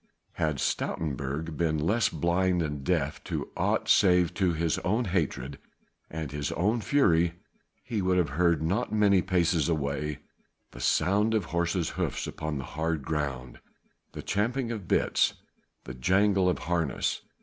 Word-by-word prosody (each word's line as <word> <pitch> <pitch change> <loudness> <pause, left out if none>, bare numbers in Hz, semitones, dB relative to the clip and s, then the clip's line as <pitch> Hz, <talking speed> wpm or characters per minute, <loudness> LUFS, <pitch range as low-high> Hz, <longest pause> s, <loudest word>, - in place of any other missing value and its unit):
Had 75 -3 -1
Stoutenburg 75 +1 -2
been 80 -2 +1
less 100 +9 +2
blind 85 +2 +1
and 75 -3 -4
deaf 75 -3 -1
to - - -4
aught - - 0
save 90 -3 +4
to 95 -3 +1
his 80 0 0
own 110 +6 0
hatred 70 -7 -2 0.5
and 80 -3 -5
his 75 -1 -3
own 105 +7 +1
fury, 85 - +3 0.5
he 115 -5 -2
would 90 0 +2
have 85 -5 +2
heard 85 +1 +2
not 100 +10 0
many 100 -3 +4
paces 85 -4 +1
away, 75 -1 -1 0.5
the - - -11
sound 105 +4 +2
of 105 -5 0
horses' 85 0 0
hoofs - - -2
upon 75 -1 -4
the 65 - -4
hard 80 +1 -2
ground, 70 -5 -3 0.5
the - - -7
champing 115 +4 -1
of 105 -6 -6
bits, - - +2 0.5
the 65 - -7
jingle 95 +7 +2
of 90 - 0
harness. 85 -5 -1
85 Hz, 150 wpm, -28 LUFS, 75-95 Hz, 0.5 s, save